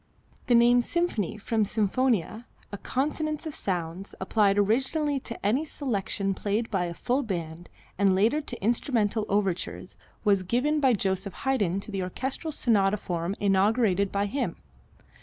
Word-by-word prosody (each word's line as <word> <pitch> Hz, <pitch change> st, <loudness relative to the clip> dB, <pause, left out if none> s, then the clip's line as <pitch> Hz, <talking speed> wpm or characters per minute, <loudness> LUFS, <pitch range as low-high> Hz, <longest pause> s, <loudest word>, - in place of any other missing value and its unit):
The 245 Hz, -, +5 dB
name 240 Hz, +1 st, +6 dB
symphony, 240 Hz, -, -1 dB
from 220 Hz, +1 st, 0 dB
sinfonia, 220 Hz, +1 st, 0 dB, 0.3 s
a 205 Hz, -, -5 dB
consonance 305 Hz, +3 st, -2 dB
of 315 Hz, -, -4 dB
sounds, 180 Hz, -2 st, -4 dB
applied 200 Hz, +1 st, +2 dB
originally 270 Hz, +8 st, +1 dB
to 230 Hz, -5 st, -8 dB
any 245 Hz, +9 st, +2 dB
selection 200 Hz, -9 st, -2 dB
played 210 Hz, +4 st, -2 dB
by 190 Hz, -4 st, +1 dB
a 170 Hz, -, -4 dB
full 255 Hz, +9 st, 0 dB
band 175 Hz, -, -5 dB, 0.3 s
and 195 Hz, -2 st, +4 dB
later 225 Hz, +11 st, +3 dB
to 245 Hz, -8 st, -7 dB
instrumental 225 Hz, -2 st, +1 dB
overtures, 195 Hz, -3 st, -2 dB, 0.3 s
was 200 Hz, -3 st, +3 dB
given 250 Hz, +11 st, +1 dB
by 265 Hz, -3 st, +4 dB
Joseph 190 Hz, -2 st, -2 dB
Haydn 205 Hz, -9 st, +1 dB
to 215 Hz, -, -8 dB
the 195 Hz, -1 st, -2 dB
orchestral 260 Hz, -, -3 dB
sonata 210 Hz, -7 st, +2 dB
form 175 Hz, -1 st, -3 dB
inaugurated 200 Hz, 0 st, +2 dB
by 200 Hz, 0 st, 0 dB
him. 220 Hz, -4 st, -2 dB
210 Hz, 145 wpm, -27 LUFS, 195-255 Hz, 0.3 s, name